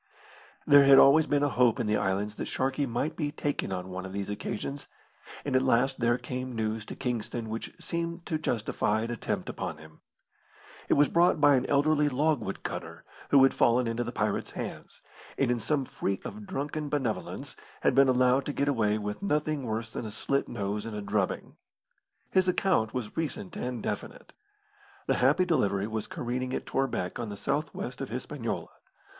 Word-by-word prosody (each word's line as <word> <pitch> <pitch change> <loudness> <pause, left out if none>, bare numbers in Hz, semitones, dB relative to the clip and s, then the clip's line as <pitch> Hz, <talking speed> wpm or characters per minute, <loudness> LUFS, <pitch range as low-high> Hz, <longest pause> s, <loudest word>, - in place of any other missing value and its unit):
There 145 -1 +8
had 135 0 +8
always 145 +4 +7
been 145 0 +2
a 145 - +3
hope 125 -4 +3
in - - 0
the 105 0 +2
islands 105 +2 -1
that - - -4
Sharkey 135 +2 0
might 130 +7 -2
be 150 -3 -2
taken 145 -8 -2
on 90 0 -4
one 95 0 -5
of 95 - -7
these 100 0 -3
occasions; 135 +7 -4 0.6
and 140 -2 0
at 130 - +5
last 130 +1 +2
there 120 0 +3
came 125 0 -5
news 110 0 -2
to - - -6
Kingston 120 -2 -3
which 115 +1 -4
seemed 170 0 -3
to 155 - -1
justify 110 -5 0
an 115 +1 -3
attempt 120 - -3
upon - - -4
him. 80 0 -15 0.9
It - - +5
was 145 0 +5
brought 170 -1 +3
by 145 -1 +6
an 130 -1 +2
elderly 150 +1 +3
logwood 145 +2 0
cutter - - -6 0.3
who 140 -2 +7
had 135 - +5
fallen 120 +1 +3
into 115 +1 -1
the 120 - -4
pirate's 105 -3 -1
hands, - - -7 0.3
and 130 -3 +2
in 120 - 0
some 140 +3 0
freak 100 -5 -3
of 210 -1 -7
drunken 150 -3 -3
benevolence 120 - -3 0.3
had - - +3
been 135 0 +5
allowed 130 +1 +3
to 145 - -2
get 140 +1 0
away 110 -6 +2
with 105 -1 -4
nothing 150 -6 0
worse 110 0 -3
than 115 - -4
a - - -5
slit 140 +6 -1
nose 105 -2 -3
and 115 -2 -6
a 105 - -3
drubbing. 100 -2 -2 0.7
His 185 0 +3
account 180 - +2
was 120 -4 -4
recent 145 - -3
and 125 -3 -4
definite. - - -5 0.7
The - - +1
Happy 145 +8 +4
Delivery 100 - +1
was 110 0 -3
careening 125 +1 -3
at - - -4
Torbec 120 -10 -1
on 115 -2 -3
the 100 - -6
south 145 +6 -1
west 125 +2 -5
of 135 - -4
Hispaniola. 125 0 -4
125 Hz, 190 wpm, -29 LUFS, 110-145 Hz, 0.9 s, There